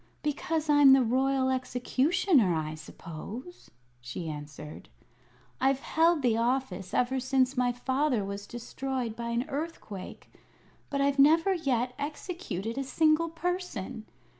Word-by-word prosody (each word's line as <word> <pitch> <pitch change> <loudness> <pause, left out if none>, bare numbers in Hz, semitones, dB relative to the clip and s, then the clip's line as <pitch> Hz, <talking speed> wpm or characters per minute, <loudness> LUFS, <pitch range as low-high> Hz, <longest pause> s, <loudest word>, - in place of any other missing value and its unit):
"Because 305 +1 -1
I'm 290 -2 +7
the 265 -1 +5
Royal 260 +2 +2
Executioner, 260 - +2
I 155 -1 -2
suppose," 170 - -9 0.3
she 125 +7 -6
answered. 150 0 -8 0.7
"I've 270 +1 +2
held 325 -2 +2
the 230 -3 +3
office 230 -6 -1
ever 260 +2 +1
since 260 0 +1
my 250 -1 +2
father 260 -2 0
was 200 +1 -6
destroyed 240 0 -4
by 235 0 -4
an 235 +4 -1
earthquake; 285 - -6 0.6
but 280 -1 -1
I've 280 0 +1
never 325 +7 +5
yet 255 -7 0
executed 285 - -4
a - - -1
single 315 +4 +2
person. 325 - -4
260 Hz, 125 wpm, -29 LUFS, 225-295 Hz, 0.7 s, I'm